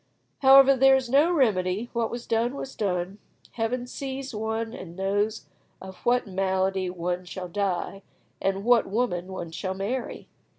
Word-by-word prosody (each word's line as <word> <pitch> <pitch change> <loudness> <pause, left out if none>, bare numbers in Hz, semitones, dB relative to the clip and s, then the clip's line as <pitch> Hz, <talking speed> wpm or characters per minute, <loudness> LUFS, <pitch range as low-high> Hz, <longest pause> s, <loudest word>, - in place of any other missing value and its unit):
However, 275 0 +7
there 270 +1 +6
was 255 -2 -1
no 295 +6 +5
remedy, 215 - +1
what 235 -1 0
was 240 0 -6
done 235 +3 0
was 270 -1 -6
done. 190 -1 -2 0.3
Heaven 240 +2 -2
sees 270 +1 -6
one, 220 +1 -3
and 170 -6 -9
knows 205 +3 -1 0.3
of 190 0 -10
what 245 +1 +1
malady 190 -1 0
one 180 0 -3
shall 180 +1 -7
die, 195 +1 -2 0.4
and 195 0 -1
what 245 -1 +4
woman 195 -5 -1
one 175 -3 -6
shall 185 +3 -4
marry! 230 +6 -4
210 Hz, 155 wpm, -26 LUFS, 185-245 Hz, 0.4 s, However